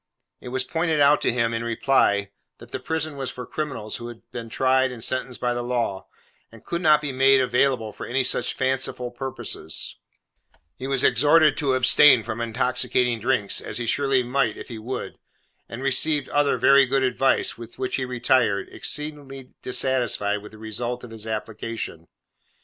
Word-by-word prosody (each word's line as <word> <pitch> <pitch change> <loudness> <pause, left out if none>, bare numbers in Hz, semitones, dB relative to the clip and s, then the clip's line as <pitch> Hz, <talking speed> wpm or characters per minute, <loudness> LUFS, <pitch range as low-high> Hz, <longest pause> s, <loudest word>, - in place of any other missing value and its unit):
It - - -11
was 130 +1 -1
pointed 160 0 -1
out 145 +1 +5
to - - +2
him, 115 -1 0
in 115 0 -2
reply, 110 -4 +1 0.3
that 120 - -15
the - - -4
prison 155 +2 -3
was 135 -2 -3
for 125 0 -7
criminals 135 -7 -5
who 120 - -8
had 120 -1 -11
been 115 -2 -7
tried 130 +2 +2
and 120 -3 -7
sentenced 130 -1 -2
by 125 0 0
the 120 - -3
law, 120 -5 -2 0.4
and 115 -1 -16
could 170 0 -3
not 155 -3 +5
be 145 -2 -3
made 135 +1 +4
available 125 -3 +1
for - - -8
any 130 +2 +1
such 130 - 0
fanciful 130 -2 -1
purposes; 120 -10 -4 0.8
he 130 - -6
was 135 -1 +1
exhorted 150 0 +5
to 135 -4 +1
abstain 130 0 +6
from 110 +2 -5
intoxicating 125 0 0
drinks, 115 -3 0
as 110 - -5
he 120 - -3
surely 135 +1 +1
might 125 -3 0
if - - -9
he 115 -2 -7
would; 120 +4 -6 0.5
and 120 +3 -7
received 140 +2 +2
other 145 -1 +2
very 140 -1 +5
good 135 +1 +1
advice, 130 +1 +2
with 115 0 -11
which 130 -1 -2
he 130 - -2
retired, 125 -4 +1
exceedingly 145 -3 -4
dissatisfied 120 -5 0
with 105 - -12
the 110 - -14
result 120 +3 -4
of 120 - -10
his 110 -1 -7
application. 110 -5 -5
125 Hz, 180 wpm, -24 LUFS, 115-135 Hz, 0.8 s, abstain